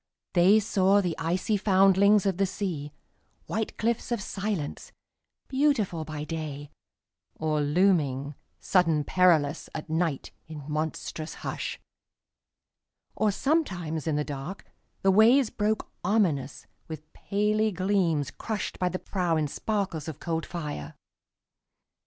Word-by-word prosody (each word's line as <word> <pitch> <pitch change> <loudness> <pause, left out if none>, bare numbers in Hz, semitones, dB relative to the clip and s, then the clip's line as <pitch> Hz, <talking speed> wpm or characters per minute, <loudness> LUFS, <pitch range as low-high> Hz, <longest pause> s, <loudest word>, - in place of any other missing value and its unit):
They 190 +4 +6
saw 195 -1 +3
the 175 -5 -1
icy 180 +6 0
foundlings 195 +1 +4
of 195 -3 +1
the 195 - +2
sea, 170 -7 -4 0.5
White 220 0 -3
cliffs 235 +2 -1
of 235 - 0
silence, 195 -6 -4 0.6
beautiful 260 - +1
by 150 -1 -5
day, 150 -2 -5 0.6
Or 155 -1 0
looming, 145 -4 +2 0.3
sudden 165 -5 +2
perilous, 160 -4 +2
at 155 0 -6
nightIn 160 -2 -3
monstrous 155 +1 -4
hush; - - -4 1.4
or 215 - +2
sometimes 190 - -1
in 155 - +1
the 150 0 0
darkThe 165 +6 -4
waves 230 +4 +5
broke 215 0 -1
ominous 175 -10 0 0.2
with 155 -1 -7
paly 210 +2 0
gleamsCrushed 185 0 -1
by 180 - +1
the 185 - -3
prow 180 -4 -1
in 155 -1 0
sparkles 190 -2 -2
of 160 - -6
cold 165 -1 -3
fire. 145 - -5
180 Hz, 115 wpm, -27 LUFS, 155-205 Hz, 1.4 s, They